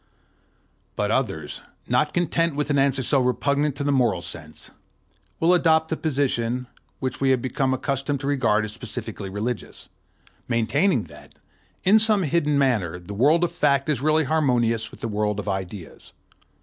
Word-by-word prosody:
But 105 Hz, 0 st, -1 dB
others, 95 Hz, -, -2 dB, 0.3 s
not 150 Hz, -, +2 dB
content 170 Hz, -2 st, 0 dB
with 150 Hz, 0 st, -1 dB
an 140 Hz, -, +2 dB
answer 135 Hz, -1 st, +2 dB
so 140 Hz, +3 st, +2 dB
repugnant 140 Hz, +3 st, +1 dB
to 140 Hz, -, -3 dB
the 145 Hz, -, +1 dB
moral 120 Hz, -10 st, +1 dB
sense, 80 Hz, -3 st, -8 dB, 0.7 s
will 170 Hz, +2 st, +4 dB
adopt 160 Hz, -2 st, +3 dB
the 160 Hz, -, 0 dB
position 130 Hz, -5 st, -1 dB, 0.3 s
which 130 Hz, -1 st, -4 dB
we 135 Hz, -, +3 dB
have 130 Hz, -1 st, +3 dB
become 130 Hz, +2 st, -1 dB
accustomed 135 Hz, +1 st, -1 dB
to -, -, -5 dB
regard 115 Hz, -7 st, +2 dB
as 105 Hz, -, -6 dB
specially 100 Hz, -2 st, -6 dB
religious, 105 Hz, +4 st, -5 dB, 0.6 s
maintaining 115 Hz, -, +1 dB
that, -, -, -15 dB, 0.5 s
in 205 Hz, +4 st, +6 dB
some 215 Hz, -3 st, +3 dB
hidden 150 Hz, -2 st, +1 dB
manner, 110 Hz, -12 st, +1 dB
the 90 Hz, +3 st, -9 dB
world 150 Hz, -, +3 dB
of 175 Hz, -, +1 dB
fact 140 Hz, +1 st, +1 dB
is 145 Hz, -4 st, 0 dB
really 155 Hz, +2 st, +3 dB
harmonious 120 Hz, -7 st, +1 dB
with -, -, -15 dB
the -, -, -2 dB
world 105 Hz, -1 st, -1 dB
of 105 Hz, -, -6 dB
ideals. 95 Hz, -2 st, -6 dB
135 Hz, 160 wpm, -24 LUFS, 110-150 Hz, 0.7 s, in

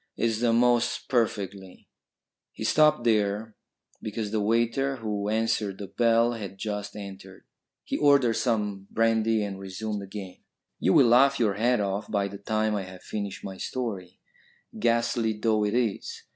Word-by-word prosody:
It's 115 Hz, -2 st, 0 dB
the 120 Hz, -1 st, +2 dB
most 120 Hz, 0 st, +2 dB
perfectly 100 Hz, -6 st, -2 dB, 0.3 s
" -, -, -64 dB
He -, -, -7 dB
stopped 150 Hz, -4 st, +4 dB
there 105 Hz, -1 st, +1 dB, 0.5 s
because 110 Hz, -1 st, -4 dB
the 110 Hz, -1 st, 0 dB
waiter 115 Hz, +5 st, +1 dB
who 105 Hz, -4 st, -3 dB
answered 110 Hz, -3 st, 0 dB
the 100 Hz, -, -6 dB
bell 115 Hz, +2 st, +2 dB
had 100 Hz, -4 st, -7 dB
just 105 Hz, 0 st, -4 dB
entered. 95 Hz, -2 st, -10 dB, 0.4 s
He -, -, -3 dB
ordered 140 Hz, -5 st, +4 dB
some 105 Hz, -5 st, -1 dB
brandy 115 Hz, -1 st, +2 dB
and 100 Hz, -2 st, -5 dB
resumed 100 Hz, +2 st, -4 dB
again. 95 Hz, -1 st, -8 dB, 0.4 s
"You 95 Hz, -, +2 dB
will 135 Hz, -, +7 dB
laugh 135 Hz, +4 st, +5 dB
your 110 Hz, -4 st, +2 dB
head 120 Hz, +3 st, +1 dB
off 100 Hz, +1 st, -2 dB
by 100 Hz, -2 st, 0 dB
the 100 Hz, 0 st, -9 dB
time 110 Hz, +1 st, 0 dB
I 100 Hz, -, -1 dB
have 90 Hz, 0 st, -12 dB
finished 100 Hz, -2 st, -5 dB
my 95 Hz, -1 st, -7 dB
story, 100 Hz, -9 st, -5 dB, 0.6 s
ghastly 115 Hz, 0 st, +1 dB
though 110 Hz, -1 st, +1 dB
it 105 Hz, +2 st, 0 dB
is. 120 Hz, -5 st, -2 dB
110 Hz, 160 wpm, -27 LUFS, 100-115 Hz, 0.6 s, will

